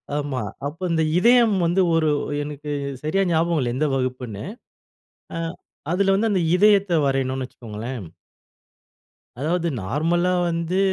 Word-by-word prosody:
ஆமா. 145 Hz, -4 st, -2 dB, 0.2 s
அப்போ 155 Hz, +6 st, -5 dB
அந்த 160 Hz, -1 st, +2 dB
இதயம் 235 Hz, +2 st, +5 dB
வந்து 175 Hz, +3 st, +2 dB
ஒரு 160 Hz, -1 st, +3 dB, 0.3 s
எனக்கு 150 Hz, 0 st, -6 dB, 0.3 s
சரியா 185 Hz, +6 st, +1 dB
ஞாபகம் 165 Hz, 0 st, +2 dB
இல்ல, 120 Hz, -2 st, -1 dB
எந்த 150 Hz, +4 st, +1 dB
வகுப்புன்னு. 125 Hz, -5 st, -3 dB, 0.9 s
அ -, -, -2 dB, 0.5 s
அதில 195 Hz, +2 st, +3 dB
வந்து 220 Hz, +3 st, +1 dB
அந்த 190 Hz, -, +2 dB
இதயத்த 200 Hz, -1 st, +4 dB
வரையனுன்னு 135 Hz, -1 st, 0 dB
வச்சுக்கோங்களேன், 115 Hz, -1 st, -7 dB, 1.3 s
அதாவது 170 Hz, +5 st, 0 dB
நார்மலா 165 Hz, -, +1 dB, 0.2 s
வந்து, 170 Hz, +2 st, -1 dB
160 Hz, 120 wpm, -23 LUFS, 130-180 Hz, 1.3 s, இதயம்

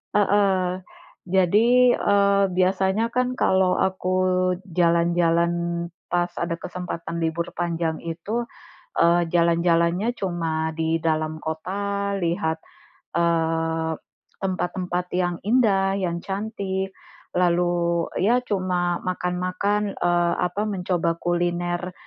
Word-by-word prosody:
Heeh, 190 Hz, -3 st, +2 dB, 0.5 s
jadi, 190 Hz, +4 st, +4 dB, 0.3 s
eee, 200 Hz, 0 st, +3 dB
biasanya 190 Hz, +5 st, +1 dB
kan, 250 Hz, 0 st, 0 dB
kalau 190 Hz, -1 st, +3 dB
aku 185 Hz, -1 st, 0 dB, 0.5 s
jalan-jalan 170 Hz, -1 st, +2 dB, 0.6 s
pas 175 Hz, 0 st, 0 dB
ada 170 Hz, -1 st, -3 dB
kesempatan 170 Hz, -1 st, -5 dB
libur 165 Hz, +1 st, -2 dB
panjang 165 Hz, -2 st, -2 dB
itu, 170 Hz, +8 st, -3 dB, 0.6 s
eee, 170 Hz, 0 st, +3 dB
jalan-jalannya 170 Hz, +3 st, +2 dB
cuma 165 Hz, -4 st, -2 dB
di 160 Hz, +1 st, 0 dB
dalam 155 Hz, -1 st, 0 dB
kota, 200 Hz, +5 st, -2 dB
lihat, 165 Hz, -2 st, -1 dB, 0.6 s
eee, 165 Hz, -1 st, +1 dB, 0.5 s
tempat-tempat 180 Hz, -1 st, -2 dB
yang 175 Hz, -1 st, 0 dB
indah, 200 Hz, -5 st, +3 dB
yang 175 Hz, -3 st, -1 dB
cantik, 195 Hz, -1 st, -3 dB, 0.5 s
lalu 175 Hz, -1 st, +1 dB
ya 235 Hz, +7 st, +3 dB
cuma 180 Hz, -4 st, 0 dB
makan-makan, 185 Hz, +3 st, -1 dB
eee, 175 Hz, 0 st, +1 dB
apa 180 Hz, +3 st, -1 dB
mencoba 180 Hz, -4 st, -1 dB
kuliner 175 Hz, +1 st, -1 dB
175 Hz, 95 wpm, -24 LUFS, 170-195 Hz, 0.6 s, jadi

